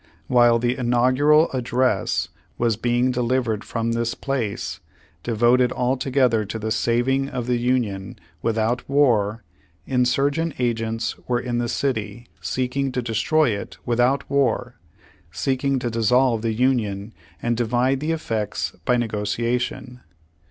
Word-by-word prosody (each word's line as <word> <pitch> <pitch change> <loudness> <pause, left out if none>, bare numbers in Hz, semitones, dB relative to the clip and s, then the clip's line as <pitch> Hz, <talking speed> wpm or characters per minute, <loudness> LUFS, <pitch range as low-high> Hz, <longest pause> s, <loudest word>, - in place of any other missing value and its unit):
While 120 +3 +5
the 120 +1 0
Inaugural 130 +5 +3
Address 125 -4 0 0.3
was 115 -2 +1
being 120 +3 +1
delivered 120 -3 0
from 115 0 -2
this 115 0 -1
place, 125 -7 -3 0.4
devoted 120 +2 +3
altogether 125 -2 +1
to 105 +2 -5
the 110 0 -3
saving 130 +5 +1
of 125 -4 -4
the 125 -1 0
Union 115 -6 -1 0.2
without 115 +2 -1
war, 115 -6 +2 0.4
insurgent 140 +5 +1
agents 115 -2 -1
v/ere 125 - +1
in 120 -1 -2
the 120 -1 -1
city, 120 -3 -2 0.2
seeking 130 +1 -1
to 125 - -1
destroy 120 +6 +2
it 100 - -5
without 120 +3 +1
war 125 -3 0 0.2
— - - -26 0.3
seeking 135 0 0
to 120 -2 -2
dissolve 115 +1 +2
the 115 -1 -1
Union 110 -4 0 0.3
and 120 0 0
divide 125 +3 +1
the 155 +3 -1
effects 110 -10 -2
by 125 - +3
negotiation. 120 +3 -2
120 Hz, 130 wpm, -23 LUFS, 115-130 Hz, 0.4 s, While